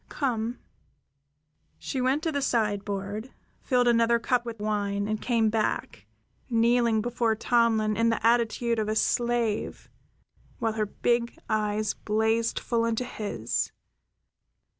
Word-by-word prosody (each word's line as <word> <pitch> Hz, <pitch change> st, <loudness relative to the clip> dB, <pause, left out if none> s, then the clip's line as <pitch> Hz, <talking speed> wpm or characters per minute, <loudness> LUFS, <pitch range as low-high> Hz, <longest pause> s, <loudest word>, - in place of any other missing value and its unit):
Come" 240 Hz, -4 st, -2 dB, 1.2 s
she 265 Hz, -, -3 dB
went 265 Hz, +4 st, +1 dB
to 325 Hz, -, 0 dB
the 285 Hz, -2 st, -1 dB
sideboard, 205 Hz, -1 st, -1 dB, 0.3 s
filled 250 Hz, -2 st, +2 dB
another 235 Hz, 0 st, +4 dB
cup 240 Hz, +1 st, 0 dB
with 225 Hz, -2 st, -6 dB
wine, 205 Hz, -1 st, -1 dB
and 215 Hz, 0 st, -2 dB
came 225 Hz, -3 st, +2 dB
back, 220 Hz, -1 st, -2 dB, 0.4 s
kneeling 235 Hz, -1 st, +3 dB
before 235 Hz, -2 st, 0 dB
Tomlin 225 Hz, -2 st, +2 dB
in 230 Hz, +1 st, +2 dB
the 225 Hz, -1 st, -1 dB
attitude 235 Hz, 0 st, +2 dB
of 215 Hz, -1 st, -1 dB
a 215 Hz, -, 0 dB
slave 235 Hz, -2 st, 0 dB, 0.7 s
while 225 Hz, -1 st, -1 dB
her 215 Hz, -1 st, -1 dB
big 235 Hz, +3 st, 0 dB
eyes 215 Hz, 0 st, 0 dB
blazed 220 Hz, +2 st, 0 dB
full 230 Hz, -1 st, 0 dB
into 230 Hz, +2 st, 0 dB
his. 205 Hz, -, -3 dB
230 Hz, 125 wpm, -27 LUFS, 215-240 Hz, 1.2 s, another